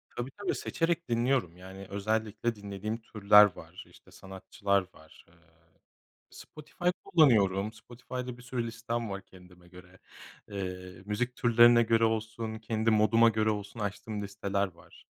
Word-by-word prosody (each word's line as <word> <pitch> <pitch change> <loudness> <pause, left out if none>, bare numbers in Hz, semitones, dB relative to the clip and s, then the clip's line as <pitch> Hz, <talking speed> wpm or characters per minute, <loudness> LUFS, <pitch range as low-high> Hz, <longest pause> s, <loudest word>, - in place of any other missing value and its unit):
Tabii, 125 +2 -4
tabii, 205 +6 -3
seçerek 165 -3 -2
dinliyorum. 120 -7 0
Yani, 95 +1 -10
özellikle 110 +3 -2
dinlediğim 105 +2 -5
türler 105 -2 +5
var, 80 +3 -11
işte - - -20
sanatçılar 95 0 -2
var. 80 0 -19
Eee, 85 - -25 1.0
Spotify 155 +3 -13 0.2
kullanıyorum. 105 - +3
Spotify'da 125 +2 -8
bir - - -13
sürü 125 -1 -3
listem 115 -1 -4
var 100 0 -5
kendime 90 -1 -18
göre. 90 +1 -16 0.5
Eee, 90 -2 -6
müzik 125 +4 -2
türlerine 120 0 +6
göre 115 0 +2
olsun, 110 0 -2
kendi 110 0 -1
moduma 110 +2 +5
göre 110 -1 +1
olsun 105 +1 -5
açtığım 105 +1 -4
listeler 100 0 -2
var. 85 - -19
110 Hz, 135 wpm, -29 LUFS, 100-115 Hz, 1.0 s, türlerine